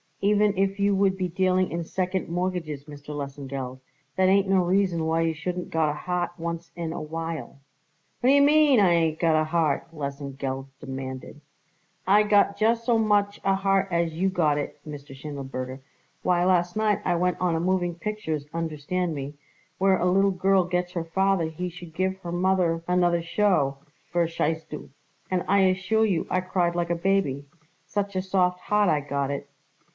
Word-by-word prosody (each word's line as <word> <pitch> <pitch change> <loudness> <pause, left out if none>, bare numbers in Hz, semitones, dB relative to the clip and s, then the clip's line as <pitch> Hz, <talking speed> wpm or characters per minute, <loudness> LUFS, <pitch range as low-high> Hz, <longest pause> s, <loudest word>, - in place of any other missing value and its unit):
Even 210 0 +3
if 195 +1 0
you 200 0 +3
would 195 -1 +2
be 185 -1 -1
dealing 185 +1 +1
in 170 0 -2
second 185 +2 -2
mortgages, 170 -5 -3
Mr. 145 0 -9
Lesengeld, 135 -2 -5 0.4
that 185 0 +3
ain't 195 0 +4
no 190 -1 +3
reason 180 -2 +1
why 165 +1 +1
you 165 0 +1
shouldn't 180 +3 -4
got 160 -2 +2
a - - -1
heart 175 +3 -2
once 170 0 -5
in 170 -2 -4
a - - -5
while." 165 -2 -5 0.6
"What 250 - +2
d'ye 280 +1 +6
mean, 290 -2 +5
I 190 -4 +5
ain't 160 -2 +1
got 160 -2 +3
a - - +2
heart?" 155 -2 0
Lesengeld 140 -3 -5
demanded. 130 +2 -7 0.7
"I 205 +2 +6
got 205 -1 +3
just 230 +1 +2
so 230 -1 +3
much 205 -2 +2
a 195 0 +3
heart 195 0 +1
as 170 -1 0
you 185 +4 +1
got 155 -6 +1
it, 145 - -4
Mr. 140 -2 -9
Schindelberger. 135 -2 -6 0.4
Why, 175 -1 +2
last 175 -1 +2
night 215 -1 +2
I 175 - +2
went 180 +1 +1
on 180 -2 +1
a - - 0
moving 175 0 0
pictures, 170 -6 -4
understand 165 +2 -2
me, 140 +1 -6 0.4
where 190 0 +4
a 180 - -1
little 195 +2 +3
girl 190 0 +3
gets 180 0 -1
her 170 -3 -2
father 190 +1 +1
he 160 +3 -4
should 175 -2 -11
give 190 +1 0
her 175 -2 -7
mother 175 -2 +1
another 175 -1 +2
show, 165 -7 +1 0.4
verstehst 165 -2 0
du, 150 - -8 0.4
and 180 -1 +1
I 200 +1 +4
assure 190 +4 +2
you 185 -6 0
I 185 - +1
cried 175 -2 0
like 175 0 -1
a - - +2
baby, 170 -6 0 0.4
such 200 -1 -3
a 185 - +1
soft 180 -1 +1
heart 210 -2 +2
I 155 -2 +3
got 140 -1 -2
it." 140 0 -5
175 Hz, 180 wpm, -25 LUFS, 155-190 Hz, 0.7 s, d'ye